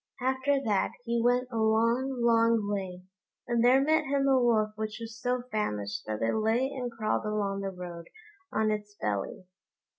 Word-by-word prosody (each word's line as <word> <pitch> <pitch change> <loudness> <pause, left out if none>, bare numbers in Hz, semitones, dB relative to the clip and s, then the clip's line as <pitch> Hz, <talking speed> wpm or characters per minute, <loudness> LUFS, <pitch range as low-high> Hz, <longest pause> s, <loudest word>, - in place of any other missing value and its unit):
After 260 +2 +1
that 210 -5 +1
he 235 -1 0
went 245 +1 +2
a 230 - -3
long, 230 +4 +1
long 230 -2 +3
way, 190 -3 -4 0.4
and 235 -1 +1
there 255 +2 +6
met 310 +1 +2
him 275 0 +1
a 265 -2 +4
Wolf 220 -3 +2
which 215 0 -4
was 225 -1 -7
so 250 0 0
famished 105 - -2
that 110 +1 -3
it 115 - +1
lay 225 +5 +1
and 250 -3 -4
crawled 220 -2 -1
along 205 -2 -1
the 195 - -2
road 175 -2 -8 0.4
on 215 0 +1
its 210 -1 -4
belly. 105 - -3
225 Hz, 175 wpm, -29 LUFS, 205-245 Hz, 0.4 s, there